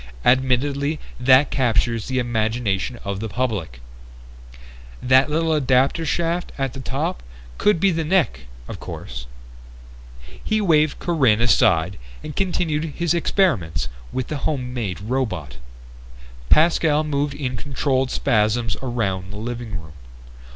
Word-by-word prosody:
Admittedly 140 Hz, +4 st, +2 dB, 0.2 s
that 130 Hz, +2 st, +5 dB
captures 115 Hz, -3 st, +1 dB
the 130 Hz, -, -2 dB
imagination 115 Hz, -2 st, -1 dB
of 100 Hz, -1 st, -3 dB
the 110 Hz, +1 st, -4 dB
public. 100 Hz, -, -3 dB, 1.2 s
That 130 Hz, +3 st, +4 dB
little 160 Hz, +1 st, +1 dB
adapter 135 Hz, +3 st, +2 dB
shaft 170 Hz, +3 st, -1 dB
at 135 Hz, -3 st, -2 dB
the 135 Hz, -, -8 dB
top 90 Hz, -, -3 dB, 0.4 s
could 210 Hz, -5 st, +3 dB
be 195 Hz, +2 st, +3 dB
the 165 Hz, -1 st, -1 dB
neck, 150 Hz, -, +1 dB, 0.2 s
of -, -, -7 dB
course...." -, -, -7 dB, 1.2 s
He 215 Hz, -, +1 dB
waved 155 Hz, -6 st, +3 dB
Corinne 135 Hz, -11 st, +2 dB
aside 90 Hz, -5 st, +3 dB, 0.2 s
and 150 Hz, -, -7 dB
continued 165 Hz, -5 st, -1 dB
his 170 Hz, -1 st, +1 dB
experiments 125 Hz, -, +1 dB, 0.2 s
with 130 Hz, -1 st, -3 dB
the 150 Hz, -, -2 dB
home 130 Hz, -3 st, -2 dB
made 100 Hz, -8 st, -3 dB
robot. 110 Hz, -, -3 dB, 0.9 s
Pascal 155 Hz, -1 st, +4 dB
moved 145 Hz, -1 st, -1 dB
in 130 Hz, -3 st, -3 dB
controlled 135 Hz, -2 st, -1 dB
spasms 110 Hz, 0 st, +1 dB
around 100 Hz, -7 st, -2 dB
the 100 Hz, -, -7 dB
living 115 Hz, -3 st, -5 dB
room. 80 Hz, -2 st, -13 dB
130 Hz, 125 wpm, -22 LUFS, 110-150 Hz, 1.2 s, that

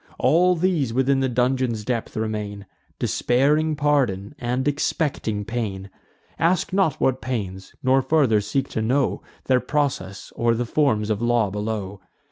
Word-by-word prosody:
All 180 Hz, +3 st, +4 dB
these 160 Hz, -9 st, 0 dB
within 135 Hz, +1 st, +2 dB
the 135 Hz, -1 st, +1 dB
dungeon's 125 Hz, -2 st, 0 dB
depth 115 Hz, -2 st, -3 dB
remain, 105 Hz, -2 st, -3 dB, 0.3 s
Despairing 150 Hz, +5 st, +1 dB
pardon, 135 Hz, -9 st, 0 dB
and 125 Hz, +2 st, -1 dB
expecting 140 Hz, -, -1 dB
pain. 100 Hz, -5 st, -4 dB, 0.5 s
Ask 180 Hz, +3 st, +1 dB
not 190 Hz, -7 st, +2 dB
what 130 Hz, -1 st, +1 dB
pains; 95 Hz, -7 st, -5 dB
nor 130 Hz, +1 st, +4 dB
farther 130 Hz, -6 st, +3 dB
seek 135 Hz, +7 st, -1 dB
to 110 Hz, -, -2 dB
know 130 Hz, +5 st, +1 dB, 0.2 s
Their 130 Hz, -1 st, +3 dB
process, 125 Hz, -9 st, -2 dB
or 115 Hz, 0 st, +2 dB
the 120 Hz, +2 st, -1 dB
forms 110 Hz, -6 st, +1 dB
of 105 Hz, +1 st, -1 dB
law 120 Hz, -4 st, +2 dB
below. 105 Hz, -2 st, -4 dB
125 Hz, 140 wpm, -23 LUFS, 105-140 Hz, 0.5 s, All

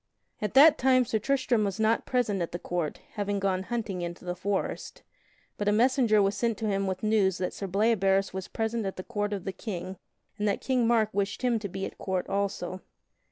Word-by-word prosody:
At 210 Hz, +2 st, -3 dB
that 295 Hz, +3 st, +8 dB
time 255 Hz, -1 st, +4 dB
Sir 225 Hz, -2 st, 0 dB
Tristram 255 Hz, -1 st, +1 dB
was 200 Hz, -1 st, -2 dB
not 220 Hz, +1 st, +2 dB
present 220 Hz, -7 st, 0 dB
at 170 Hz, -, -3 dB
the -, -, -1 dB
court, 175 Hz, -3 st, -3 dB
having 205 Hz, -1 st, -2 dB
gone 190 Hz, -1 st, 0 dB
hunting 210 Hz, -3 st, -3 dB
into 175 Hz, +1 st, -6 dB
the 180 Hz, -, -2 dB
forest, 195 Hz, +2 st, -3 dB, 0.6 s
but 205 Hz, -, -1 dB
a -, -, +5 dB
messenger 230 Hz, -2 st, +4 dB
was 195 Hz, +1 st, +1 dB
sent 230 Hz, +1 st, 0 dB
to 220 Hz, -, -2 dB
him 195 Hz, -1 st, 0 dB
with 190 Hz, +1 st, -3 dB
news 205 Hz, -4 st, +2 dB
that 180 Hz, -, -2 dB
Sir 195 Hz, -, -5 dB
Bleoberis 195 Hz, -1 st, +2 dB
was 190 Hz, 0 st, -5 dB
present 225 Hz, 0 st, -2 dB
at 190 Hz, -, -4 dB
the 185 Hz, -, -6 dB
court 205 Hz, -2 st, -2 dB
of 200 Hz, -3 st, -3 dB
the 195 Hz, -, -4 dB
King 185 Hz, -2 st, -6 dB, 0.4 s
and 210 Hz, -, +1 dB
that 200 Hz, -, +1 dB
King 250 Hz, -3 st, +1 dB
Mark 225 Hz, -2 st, +3 dB
wished 200 Hz, +4 st, -2 dB
him 240 Hz, -3 st, +2 dB
to 205 Hz, -2 st, -5 dB
be 195 Hz, +2 st, -4 dB
at -, -, -9 dB
court 190 Hz, -1 st, -2 dB
also. 190 Hz, -2 st, -2 dB
205 Hz, 215 wpm, -28 LUFS, 190-225 Hz, 0.6 s, that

